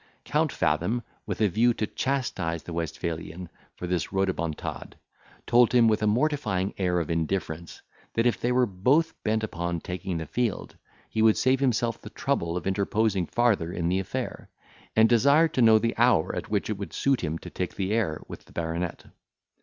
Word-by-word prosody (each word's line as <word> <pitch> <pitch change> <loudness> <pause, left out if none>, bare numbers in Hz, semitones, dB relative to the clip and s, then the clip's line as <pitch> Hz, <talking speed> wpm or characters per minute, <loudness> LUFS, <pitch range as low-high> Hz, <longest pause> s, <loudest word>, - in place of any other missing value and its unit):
Count - - +1
Fathom, 120 +2 0 0.2
with - - -3
a 105 - +5
view 115 +6 +2
to 110 - -1
chastise 100 - -2
the 85 - -7
Westphalian 85 +1 -4 0.3
for - - -6
this 90 -2 -1
rhodomontade, 95 -5 -2 0.5
told 120 -1 +5
him, 120 -2 +6
with 110 -1 +2
a 105 - +2
mortifying 110 -6 0
air 90 -2 +1
of 85 -1 -3
indifference, 85 0 -3 0.3
that 115 - +2
if 115 -6 +1
they 120 - +1
were 125 0 +4
both 130 - +2
bent 110 0 0
upon 85 -4 -2
taking 90 +1 -4
the 80 - -4
field, 115 +7 -2 0.3
he 110 - -2
would 110 -1 +5
save 130 +1 +3
himself 120 -4 0
the - - -9
trouble 85 +1 -1
of 90 - -5
interposing 100 -1 +1
farther 110 -9 +1
in 85 -1 -1
the 95 +2 +1
affair; 95 - -5 0.5
and 110 0 +6
desired 140 +8 +4
to 130 - +1
know 110 -1 +7
the 115 +1 0
hour 120 -9 +3
at - - -5
which 105 -2 0
it 105 -2 -3
would 100 -5 -6
suit 135 -3 +1
him 80 0 -1
to - - -10
take 90 - -4
the 95 0 -2
air 100 -9 0
with - - -10
the - - -20
baronet. 85 +1 -3
100 Hz, 185 wpm, -27 LUFS, 85-120 Hz, 0.5 s, know